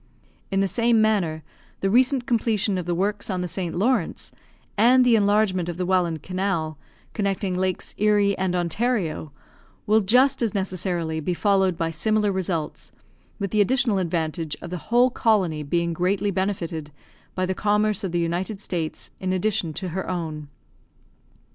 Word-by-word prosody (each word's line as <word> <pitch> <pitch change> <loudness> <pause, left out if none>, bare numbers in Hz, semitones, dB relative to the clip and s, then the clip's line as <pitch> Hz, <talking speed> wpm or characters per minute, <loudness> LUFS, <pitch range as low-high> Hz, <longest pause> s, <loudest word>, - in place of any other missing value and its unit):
In 195 0 +1
the 195 - +2
same 230 +4 +2
manner, 190 -8 +1 0.4
the 195 - +1
recent 255 +2 +3
completion 220 -5 +1
of 175 - -6
the 175 - 0
works 205 +4 -1
on 185 -2 -1
the 180 - -2
St. 175 -1 -3
Lawrence, 240 +9 0 0.4
and 250 +4 +5
the 240 -2 +5
enlargement 205 -4 +2
of 175 - -5
the 180 - -1
Welland 175 -4 +1
Canal, 180 -5 -2 0.3
connecting 195 -2 -1
Lakes 185 0 -2
Erie 205 -1 +3
and 185 -1 -1
Ontario, 175 - -1 0.5
will 220 +1 +4
just 250 +8 +3
as 225 -4 0
necessarily 180 -4 -2
be 175 +3 -2
followed 190 -2 +2
by 165 -1 -1
similar 210 +5 +1
results, 175 -5 -3 0.5
with 200 -3 -3
the 215 - +3
additional 240 -1 +2
advantage 165 -3 -2
of 170 - -9
the 180 - -3
whole 245 +2 +4
colony 190 -11 +1
being 170 +3 -1
greatly 195 +4 0
benefitted 175 -5 -2 0.5
by 185 - 0
the 190 - -1
commerce 210 +1 +1
of 190 - -2
the 175 - 0
United 175 +5 -2
States, 170 -5 -4
in 185 -1 -2
addition 185 -2 0
to 185 +4 -5
her 190 +3 -4
own. 160 -4 -4
190 Hz, 160 wpm, -24 LUFS, 170-210 Hz, 0.5 s, and